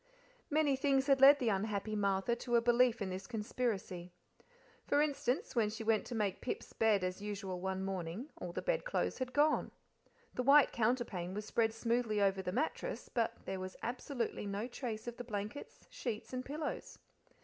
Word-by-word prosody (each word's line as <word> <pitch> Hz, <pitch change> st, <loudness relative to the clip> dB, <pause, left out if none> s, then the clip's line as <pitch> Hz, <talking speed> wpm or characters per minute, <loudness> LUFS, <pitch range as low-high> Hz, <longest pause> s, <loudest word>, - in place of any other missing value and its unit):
Many 295 Hz, -2 st, +3 dB
things 270 Hz, 0 st, +2 dB
had 275 Hz, -2 st, +4 dB
led 280 Hz, +2 st, +10 dB
the 245 Hz, -4 st, +1 dB
unhappy 210 Hz, +1 st, -1 dB
Martha 200 Hz, +2 st, +1 dB
to 240 Hz, 0 st, -1 dB
a -, -, +7 dB
belief 240 Hz, -1 st, +3 dB
in 190 Hz, -, -3 dB
this 190 Hz, +1 st, -5 dB
conspiracy. 210 Hz, -6 st, -3 dB, 0.8 s
For 290 Hz, -, +3 dB
instance, 280 Hz, -4 st, 0 dB
when 220 Hz, -3 st, +3 dB
she 220 Hz, +1 st, -5 dB
went 220 Hz, -1 st, +2 dB
to 245 Hz, -, -4 dB
make 205 Hz, -4 st, -1 dB
Pip's 250 Hz, -, -4 dB
bed 215 Hz, -4 st, +3 dB
as 185 Hz, +1 st, -2 dB
usual 200 Hz, -3 st, -4 dB
one 190 Hz, +1 st, -2 dB
morning 190 Hz, -, -4 dB
all 175 Hz, -, -5 dB
the -, -, -4 dB
bedclothes -, -, 0 dB
had 255 Hz, -1 st, -2 dB
gone. 295 Hz, +3 st, +3 dB, 0.6 s
The -, -, -1 dB
white 275 Hz, +2 st, +6 dB
counterpane 220 Hz, -6 st, 0 dB
was 210 Hz, 0 st, -4 dB
spread 225 Hz, +1 st, +2 dB
smoothly 230 Hz, -1 st, 0 dB
over 195 Hz, -1 st, +2 dB
the 180 Hz, -, -3 dB
mattress, 315 Hz, -, -2 dB
but 230 Hz, -3 st, -1 dB
there 190 Hz, 0 st, -3 dB
was 185 Hz, 0 st, -6 dB
absolutely 240 Hz, -3 st, -3 dB
no 200 Hz, +2 st, -2 dB
trace 235 Hz, -3 st, -5 dB
of 240 Hz, -1 st, -6 dB
the 245 Hz, -, -5 dB
blankets, 215 Hz, +3 st, -6 dB
sheets, 230 Hz, 0 st, -5 dB
and 255 Hz, 0 st, -2 dB
pillows. 295 Hz, +3 st, -5 dB
225 Hz, 180 wpm, -35 LUFS, 200-255 Hz, 0.8 s, led